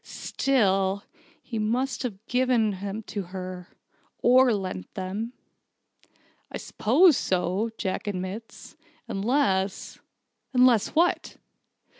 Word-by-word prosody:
Still, 200 -7 0 0.4
he 230 -3 -4
must 245 +5 -1
have 225 -4 -5
given 245 -3 +2
them 200 +3 -5
to 205 - -4
her 185 -1 -7 0.6
or 255 +1 +6
lent 185 - -3
them." 200 +6 -4 1.2
"I - - -4
suppose 300 - +4
so," 185 +4 0
Jack 190 +2 -3
admitted, 195 +3 -4 0.6
"unless 200 -3 0 0.3
" - - -51
"Unless 250 -2 +4
what?" 345 +3 +1
215 Hz, 100 wpm, -26 LUFS, 190-250 Hz, 1.2 s, or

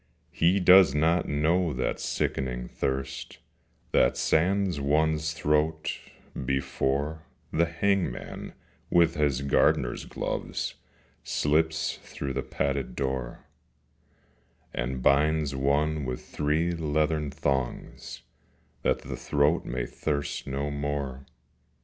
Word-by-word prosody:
He 90 +4 +3
does 90 -5 +7
not 80 +4 +2
know 80 +3 +1
that 65 - -2
sickening 60 -2 -2
thirst 65 +1 -3 0.5
That - - +3
sands 90 0 +2
one's 75 +2 +1
throat, 75 0 0 0.5
before 70 +3 -1 0.3
The 85 +1 +3
hangman 90 -3 -1 0.4
with 85 -1 +4
his 70 -3 +1
gardener's 60 -3 +2
gloves - - -3 0.5
Slips 80 +2 +1
through 70 -1 -5
the 65 - -1
padded 70 -1 -2
door, 65 -3 -3 1.3
And 65 +1 -3
binds 75 +1 +3
one 75 +3 +1
with 65 -1 -4
three 75 +4 0
leathern 75 -2 0
thongs, 70 -3 -3 0.6
That - - +1
the - - -5
throat 75 +3 +1
may 60 -1 -2
thirst 70 -2 -3
no 70 +2 -2
more. 70 -2 -3
75 Hz, 100 wpm, -27 LUFS, 70-80 Hz, 1.3 s, does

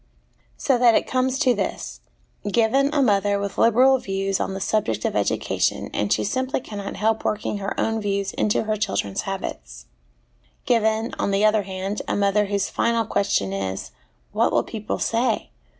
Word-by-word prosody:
So 265 -4 +1
that 240 -2 +6
it - - +2
comes 255 0 0
to 260 -4 +3
this - - -4 0.5
given, 250 +6 +3
a 290 -2 +2
mother 205 -3 +2
with 200 0 -4
liberal 255 +4 +5
views 195 -2 -2
on 190 - -2
the - - -4
subject 190 - -1
of - - -1
education, 105 -1 0
and 105 -1 -1
she - - +2
simply 260 +5 -1
cannot 205 -5 -7
help 220 +2 0
working 210 -1 -2
her 195 0 -4
own 225 0 0
views 200 -1 -1
into 210 - +1
her 215 0 -1
children's 195 - -1
habits; - - -6 0.8
given, 220 -1 +1
on - - 0
the 200 +1 +2
other 215 0 +4
hand, 195 +1 -4
a - - 0
mother 200 +1 +2
whose 200 -1 -1
final 230 -1 0
ques 200 0 0
tion 95 - +1
is, 95 -1 -4 0.4
'What - - +2
will - - +2
people 215 -1 -4
say? 230 0 0
210 Hz, 175 wpm, -23 LUFS, 195-230 Hz, 0.8 s, that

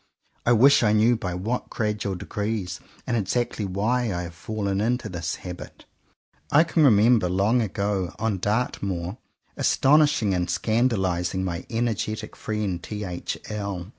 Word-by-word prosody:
I - - +5
wish 135 +5 +6
I 105 -3 +3
knew 110 +3 +4
by 90 -6 -4
what 110 +8 -3
gradual 105 -3 -2
degrees, 100 -1 -3 0.3
and 120 - -1
exactly 115 +1 -1
why, 110 +5 0
I 90 -1 -2
have 85 -1 -7
fallen 100 +2 -2
into 120 +3 0
this 85 -2 -3
habit. 90 -1 -9 0.7
I 150 +2 +6
can 165 -2 +2
remember 110 -5 +5
long 100 +7 +2
ago, 100 -3 -2
on 110 -3 -1
Dartmoor, 100 -3 -2 0.4
astonishing 145 -7 +3
and 90 -1 -1
scandalizing 95 -4 0
my 90 -2 -4
energetic 110 -2 -2
friend 105 -5 -3
T. 105 +2 -5
H. 90 -3 -4
L. 100 -4 -4
105 Hz, 140 wpm, -25 LUFS, 90-115 Hz, 0.7 s, wish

